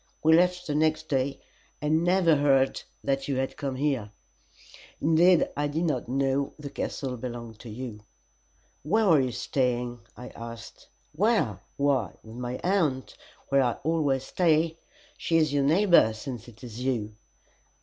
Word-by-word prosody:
We 160 +1 +6
left 180 +1 +3
the 150 - -2
next 155 +1 +1
day, 135 0 -1 0.4
and 155 +2 +1
never 175 -2 +4
heard 135 -2 +2 0.2
that 135 0 -1
you 140 - -1
had 130 0 -2
come 135 -2 -4
there; 135 -8 0 0.9
indeed, 165 +3 +4
I 145 +1 0
did 155 +4 -2
not 140 -8 -1
know 135 +1 0
the 145 -2 -8
castle 130 -2 -4
belonged 120 -2 -7
to 115 - -10
you." 115 -1 -7 0.8
"Where 215 +10 +2
were 165 -6 +5
you 130 -1 -1
staying?" 120 0 -1 0.2
I 125 - -8
asked 115 -1 -10 0.2
"Where? 155 - +1 0.2
Why, 140 -6 +1
with 110 +1 -11
my 125 0 -4
aunt, 165 -9 0 0.3
where 140 0 +4
I 125 -2 +2
always 145 -4 +1
stay. 165 +1 +1 0.4
She 165 - +1
is 155 -3 +2
your 140 -1 +2
neighbor, 170 - +5
since 120 +1 -7
it 120 +1 -15
is 120 0 -7
you." 115 -5 -1
140 Hz, 155 wpm, -27 LUFS, 125-160 Hz, 0.9 s, We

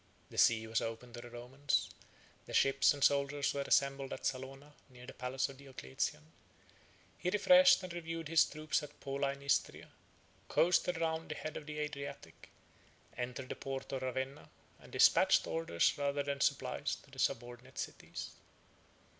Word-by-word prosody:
The - - -10
sea 110 -1 +5
was 110 0 0
open 115 +1 -5
to 120 - -7
the 120 - -10
Romans: 125 +4 -1 0.6
the - - -4
ships 135 0 +5
and 145 -2 -2
soldiers 140 0 +2
were 140 - -2
assembled 140 0 +1
at - - -7
Salona, 135 +3 -4 0.2
near 125 -1 -13
the - - -9
palace 130 +1 -2
of 135 - -11
Diocletian: 75 - -4 1.0
he 180 - 0
refreshed 185 -1 +6
and 180 -2 -6
reviewed 165 -2 -5
his 165 0 +5
troops 155 0 -1
at 150 -1 -11
Pola 140 0 -1
in 140 0 -13
Istria, 140 - 0 0.6
coasted 180 0 +2
round 160 -1 -1
the 155 - -3
head 155 - -6
of 150 - -7
the 150 0 -6
Adriatic, 145 -2 -6 0.7
entered 125 +1 -5
the - - -3
port 135 0 -5
of 135 - -3
Ravenna, 130 +2 -4 0.3
and - - -16
despatched - - +5
orders 165 - +1
rather 140 0 0
than 140 -1 -3
supplies - - 0
to - - -21
the - - -11
subordinate 120 +2 -2
cities. - - -6
140 Hz, 165 wpm, -34 LUFS, 130-150 Hz, 1.0 s, refreshed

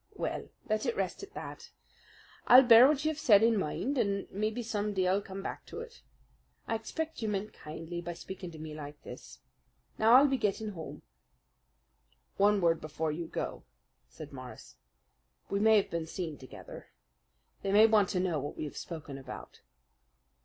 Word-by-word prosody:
"Well, - - -4 0.2
let 215 +3 0
it 235 - 0
rest 190 -2 -2
at 400 +1 -11
that. - - -8 0.8
I'll 255 +2 +10
bear 240 0 +9
what 295 0 +1
you 315 - +3
have 305 - -7
said 220 -8 +6
in 230 0 +4
mind, 240 - -1
and 200 -2 0
maybe 215 +4 -2
some 210 -2 -2
day 185 -1 +2
I'll 190 +2 +2
come 195 -1 -8
back - - -5
to - - -7
it. 470 0 -11 0.7
I - - -1
expect 315 +9 -4
you 220 - -1
meant 205 +1 -3
kindly 165 +3 -7
by 175 0 -5
speaking 185 +1 -8
to 165 - -11
me 155 0 -7
like 145 -1 -8
this. - - -11 0.6
Now 220 +2 +5
I'll 275 +3 +8
be 270 -2 0
getting 215 0 -1
home." 165 -6 -8 1.3
"One 205 0 +4
word 165 -1 +2
before 155 +1 -2
you 165 +2 -4
go," - - -4 0.5
said 150 -2 -11
Morris. 130 -2 -10 0.7
"We 200 - +1
may 220 +1 +6
have 200 - 0
been 165 -1 -3
seen 165 -2 -4
together. 130 -2 -11 0.7
They 195 - -2
may 210 +2 +7
want 215 -4 +4
to 180 - 0
know 180 -4 0
what 145 +1 -6
we - - -4
have 150 - -6
spoken 150 -5 -7
about." 135 - -10
200 Hz, 180 wpm, -31 LUFS, 165-225 Hz, 1.3 s, I'll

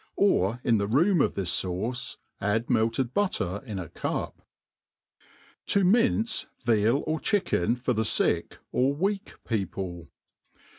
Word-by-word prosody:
Or 120 - +2
in 115 -4 +3
the 100 - 0
room 170 - +3
of^his 100 -9 0
fauce, 95 +7 -3 0.2
add 105 +4 0
melted 115 +2 +1
butter 100 - -1
in 105 -3 -4
a 90 -3 -5
cup. - - -4 1.3
To.minci 220 +3 +2 0.2
Vial 115 +3 +2
or 155 0 -1
Chicken 150 - +1
for 125 +1 -1
the 110 - 0
SUk^ 110 - +1 0.2
or 135 +3 +2
weak 195 +5 -2
Papli. 95 - -3
120 Hz, 120 wpm, -27 LUFS, 100-170 Hz, 1.3 s, in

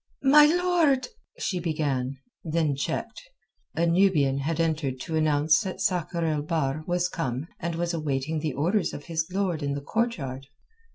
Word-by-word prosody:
"My 295 +2 +8
lord...." 340 - +2 0.3
she 190 - -2
began, 145 -6 -1 0.3
then 160 -3 0
checked. 140 - -3 0.5
A 170 - +2
Nubian 165 -6 +3
had 160 +4 -2
entered 155 -5 0
to 160 - -4
announce 155 0 +3
that 190 -3 -5
Sakr 180 -3 0
el 155 -2 0
Bahr 150 -1 -1
was 175 0 +1
come 135 -6 -3
and 170 0 -3
was 170 +1 -1
awaiting 155 -1 -1
the 150 -2 -2
orders 175 +9 0
of 145 - -8
his 160 -2 -2
lord 185 -4 -1
in 140 -1 -1
the 140 - -4
courtyard. 140 - -2
160 Hz, 160 wpm, -26 LUFS, 145-180 Hz, 0.5 s, My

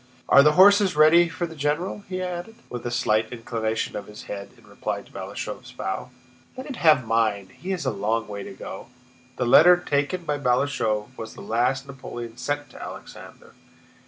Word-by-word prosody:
"Are - - +8
the 150 +1 +5
horses 200 +1 +6
ready 160 +3 +6
for 175 +1 -3
the 165 -1 -9
general?" 155 +7 -2
he 185 0 -3
added, 180 +4 -5 0.2
with 120 -1 -5
a - - -1
slight 110 -2 +1
inclination 115 -2 -3
of 105 - -5
his 105 0 -10
head 100 -1 -7
in - - -21
reply - - -4
to - - -21
Balashëv's - - -7
bow. - - -4 0.5
"Let 260 - -6
him 280 - -6
have 155 - +4
mine, 110 -4 +1
he 185 - -9
has 185 -6 -2
a 130 - +1
long 110 +2 -1
way 100 -1 -6
to 95 - -8
go!" 95 - -8 0.5
The 125 - -1
letter 175 +9 +7
taken 170 +1 -1
by 150 -3 -2
Balashëv 125 -4 0
was 115 - -7
the - - -10
last 125 +4 0
Napoleon 120 -4 -8
sent 145 -1 -3
to - - -12
Alexander. - - -10
135 Hz, 190 wpm, -24 LUFS, 115-170 Hz, 0.5 s, Are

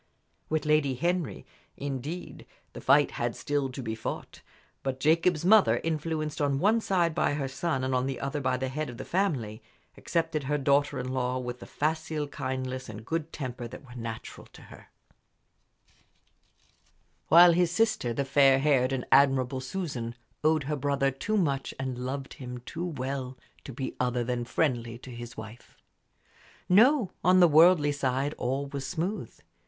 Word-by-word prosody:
With 155 0 0
Lady 150 -3 +2
Henry, 175 +3 -2 0.3
indeed, 140 +5 -6 0.3
the - - -8
fight - - +4
had - - -2
still 145 -2 -1
to 130 +1 -7
be 110 -1 -3
fought. 110 - -6 0.4
But 130 -1 -3
Jacob's 165 +3 +2
mother, 215 +1 +5
influenced 155 -1 -2
on 140 -1 +1
one 215 +9 +3
side 175 -5 +1
by 150 - +1
her 140 -2 -2
son 135 0 -2
and 130 0 -1
on 130 +1 +1
the 135 -2 -3
other 140 +1 -3
by 130 -1 0
the 130 +1 -2
head 150 +2 -3
of 120 - -9
the - - -7
family, 135 - -1 0.3
accepted 165 -4 -2
her 150 +2 0
daughter 140 0 +2
in 125 0 -3
law 125 -1 -1
with 125 -1 -5
the - - -10
facile 155 0 -2
kindliness 130 -2 -4
and 110 +1 -9
good 165 +3 -3
temper 125 -4 -5
that 135 - -11
were 125 - -13
natural 115 -2 -7
to - - -14
her; - - -15 2.4
while 170 +2 +8
his 175 0 +3
sister, 215 - +1
the 135 +4 -1
fair 135 0 +5
haired 135 -2 +2
and 130 -2 -2
admirable 135 -2 +4
Susan, 130 -6 -4 0.3
owed 155 -1 +3
her 150 +2 -2
brother 140 -1 +1
too 210 +11 -2
much 140 -8 -1
and 130 -2 -3
loved 135 +2 -4
him 125 -2 -7
too 170 +1 -4
well 130 -3 -4 0.3
to - - -8
be 130 +2 -5
other 125 -1 0
than 120 0 -2
friendly 120 -3 -1
to 125 +1 -11
his 120 +1 -9
wife. 110 +2 -11 0.9
No; 225 +2 +5
on 185 +1 +5
the 175 - +8
worldly 160 -1 +6
side 140 0 -1
all 135 +3 -1
was 140 -1 -5
smooth. 175 +9 -3
140 Hz, 170 wpm, -28 LUFS, 130-160 Hz, 2.4 s, while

